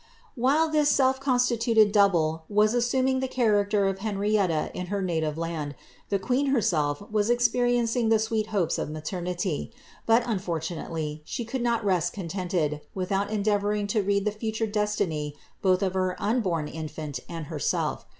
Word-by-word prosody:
While 285 +5 +2
this 305 -2 +2
self 265 -2 +3
constituted 240 -5 +3
double 165 -6 +3
was 210 +1 +3
assuming 260 +2 +1
the 265 - -1
character 205 -5 +2
of 195 0 -2
Hen 210 -1 -3
rietta 195 -6 +1
in 180 - -5
her 200 +2 -2
native 160 -5 -1
land, 160 -3 -3 0.3
the 200 - +2
queen 250 +8 0
herself 165 - +1
was 210 0 +1
experiencing 240 -1 +2
the 225 - +5
sweet 220 0 -1
hopes 200 -7 0
of - - -3
maternity; 175 +3 -3 0.4
but 230 +2 +5
unfortunately, 165 -6 -3
she 235 - -4
could 245 +3 -3
not 235 -2 0
rest 175 -3 +1
contented, 175 -5 -2
without 195 +2 -1
endeavouring 205 0 0
to 215 - +2
read 200 0 0
the 210 - +2
future 220 +1 -2
destiny 205 -9 -1 0.3
both 185 0 +3
of 190 -1 0
her 185 -1 0
unborn 190 -9 0
infant 155 -3 -6
and 165 -2 -5
herself. 150 -3 -2
205 Hz, 155 wpm, -26 LUFS, 170-230 Hz, 0.4 s, the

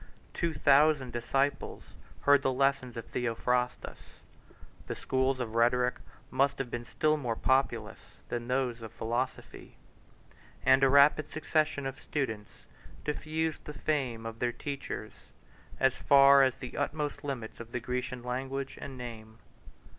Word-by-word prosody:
Two 170 -1 -1
thousand 140 -2 +4
disciples 135 +4 -1 0.4
heard 145 -1 +5
the 135 - +1
lessons 130 -2 0
of 115 - -5
Theophrastus; 125 +1 -2 0.7
145 - - -29
the - - -3
schools 130 0 0
of 115 -3 -4
rhetoric 125 +2 +2 0.3
must 140 +2 +2
have 125 -3 -4
been 120 0 -4
still 155 +5 +1
more 120 -6 -2
populous 120 -4 0 0.3
than 120 0 -3
those 125 -2 -1
of 110 -2 -8
philosophy; 120 +3 -4 0.9
and 130 +1 +5
a 135 - +6
rapid 140 +2 +5
succession 155 -2 0
of 135 +1 -5
students 110 -8 -4 0.4
diffused 155 +1 -2
the 150 - -7
fame 130 -7 -1
of 115 0 -6
their 120 -1 +1
teachers 140 +2 -5 0.7
as 135 -1 +4
far 140 0 +7
as 130 -2 +3
the 125 - -8
utmost 145 0 -2
limits 130 -6 -5
of 115 0 -9
the 125 - -2
Grecian 125 +1 -4
language 135 +2 -4
and 135 -2 -7
name. 110 -3 -8
130 Hz, 140 wpm, -30 LUFS, 120-140 Hz, 0.9 s, far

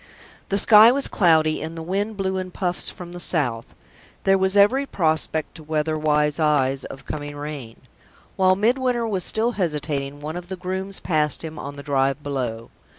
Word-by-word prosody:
The 200 - +1
sky 215 +2 +8
was 275 +2 0
cloudy; 160 -4 +2
and 160 +2 -6
the 165 - -5
wind 200 +5 -2
blew 190 -1 -1
in 185 0 -4
puffs 180 -1 -1
from 175 -1 -9
the 175 - -8
south; 125 -10 -1 0.5
there 195 - +4
was 190 +1 +2
every 260 +8 +4
prospect, 160 - 0
to 160 - -11
weather 155 0 -1
wise 150 0 +1
eyes, 135 -3 +1
of 135 - -10
coming 145 -1 -6
rain. 145 -6 -7 0.6
While 185 0 +4
Midwinter 240 +3 +1
was 195 -5 -1
still 225 +2 +1
hesitating, 150 - -3
one 155 +3 -5
of 175 0 -9
the 190 - -4
grooms 190 +2 -4
passed 150 -4 0
him 160 -1 -7
on 140 0 -7
the 140 - -9
drive 140 0 0
below. 125 -6 -4
160 Hz, 180 wpm, -22 LUFS, 145-190 Hz, 0.6 s, sky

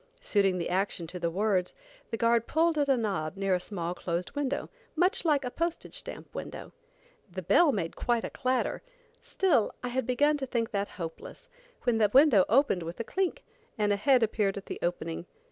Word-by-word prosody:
Suiting 200 - +2
the 170 - -2
action 185 -1 -1
to 180 +2 -7
the 170 - 0
words, 190 0 0 0.3
the 225 - -3
guard 230 +1 +2
pulled 330 +1 +2
at 290 -2 +1
a 270 - +4
knob 195 -7 -2
near 195 -1 +1
a 180 - +2
small 175 -2 -4
closed 175 0 -3
window, 285 -1 -2 0.3
much 365 +8 +2
like 295 -5 +2
a 250 - -3
postage 335 +3 -3
stamp - - -7
window. - - -7 0.6
The 185 +1 -5
bell 325 - +5
made 180 -9 -3
quite 240 -2 0
a - - -4
clatter, 255 -1 -1 0.4
still 320 - +1
I 250 - -2
had 260 +1 -2
begun 290 +4 +3
to 270 -2 -4
think 235 -2 -1
that 200 -1 -1
hopeless, 180 - -8 0.3
when 235 -3 +2
the 210 -2 +4
window 260 -7 +6
opened 250 -5 +3
with 170 +4 -6
a - - -1
clink, 375 - -2 0.3
and 210 -1 +2
a - - +2
head 255 +4 +4
appeared 205 -3 0
at 195 - -7
the - - -6
opening. 170 -1 -3
225 Hz, 195 wpm, -29 LUFS, 185-275 Hz, 0.6 s, window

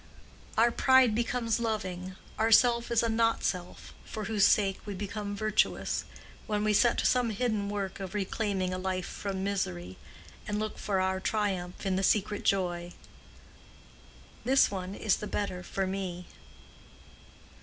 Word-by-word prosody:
Our 235 +2 +5
pride 260 -2 +5
becomes 235 0 0
loving, 190 -5 -3 0.2
our 225 +1 +2
self 235 +1 +5
is 235 -1 +2
a - - +2
not 225 0 +1
self 180 -1 -3
for 215 - -6
whose 210 -1 +3
sake 195 -2 +2
we 205 -2 -6
become 205 +1 -4
virtuous, 215 +1 0 0.4
when 210 -1 0
we 215 0 +2
set 240 +3 +4
to - - 0
some 250 -2 +3
hidden 215 -2 -1
work 200 -2 -3
of 190 0 -6
reclaiming 195 -2 -1
a 185 - -3
life 185 -1 -2
from 195 -2 -4
misery 95 - -3 0.5
and 210 - -1
look 215 0 -3
for 195 -2 0
our 190 0 0
triumph 190 -4 -2
in 190 -1 +1
the 195 - 0
secret 205 +1 +1 2.0
joy—"This 265 -1 +4
one 190 0 -4
is 210 -2 +1
the 210 - -5
better 195 -4 -3
for 195 +1 -2
me." 185 -2 -4
205 Hz, 150 wpm, -29 LUFS, 190-220 Hz, 2.0 s, Our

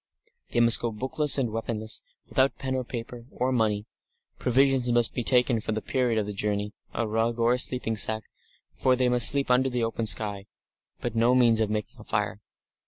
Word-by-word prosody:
They - - -1
must 115 0 +6
go 120 - -2
bookless 130 +7 +1
and 125 -5 -1
weaponless, 110 0 -4 0.3
without 130 +1 +1
pen 130 -1 -4
or 130 -1 -2
paper, 120 0 -8
or 130 -1 -2
money. 110 -4 0 0.5
Provisions 130 0 +2
must 120 -1 +4
be 120 - -3
taken 125 -1 +2
for 110 - -3
the 110 - -3
period 125 -4 -1
of 105 - 0
the 105 - -6
journey, 105 +1 -3 0.2
a 115 - -3
rug 115 +2 -1
or 120 +1 +2
sleeping 125 -3 0
sack 110 +1 0 0.5
for 130 -1 +1
they 125 0 +1
must 125 -2 +8
sleep 140 -2 +1
under 130 +1 +3
the 125 -2 -2
open 115 0 -2
sky 105 -2 +1 0.5
but - - -4
no 115 +2 +2
means 120 -3 +3
of 110 -2 0
making 105 -1 -5
a - - -11
fire. - - -3
120 Hz, 195 wpm, -26 LUFS, 110-125 Hz, 0.5 s, must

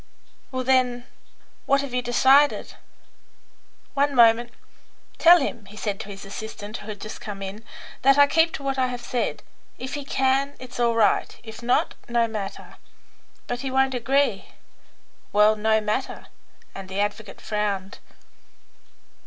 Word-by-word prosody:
"Well, 255 -1 -2
then, 250 -1 +2 0.6
what 275 0 +3
have 280 -3 -7
you 250 - +1
decided?" 265 +4 +3 1.2
"One 285 0 +1
moment. 235 0 +5 0.7
Tell 345 +1 +8
him," 235 -6 -4
he 210 +1 -13
said 205 -2 -3
to 205 - -7
his 195 0 -9
assistant, 210 +1 -7
who 205 - -12
had 210 -1 -6
just 215 - -8
come 200 -2 -6
in, 195 +3 -7 0.4
"that 275 +1 +5
I 285 - +8
keep 325 +3 +3
to 280 - -6
what 270 -1 -2
I 255 - +2
have 245 -1 -6
said. 245 -2 -2 0.3
If 260 - -6
he 290 - -4
can, 270 +1 0
it's 250 -1 -9
all 235 -1 +2
right; 220 -2 +1
if 220 0 -10
not, 245 +1 +1 0.2
no 235 -1 +2
matter." 210 -3 -7 0.7
"But 245 - -4
he 270 +1 -4
won't 265 0 +2
agree." 270 +4 +1 0.9
"Well, 210 +1 +5
no 220 +1 +2
matter," 215 +5 -3 0.5
and 195 -1 -9
the 190 +1 -4
advocate 205 0 -3
frowned. 200 -2 -3
240 Hz, 155 wpm, -24 LUFS, 210-265 Hz, 1.2 s, Tell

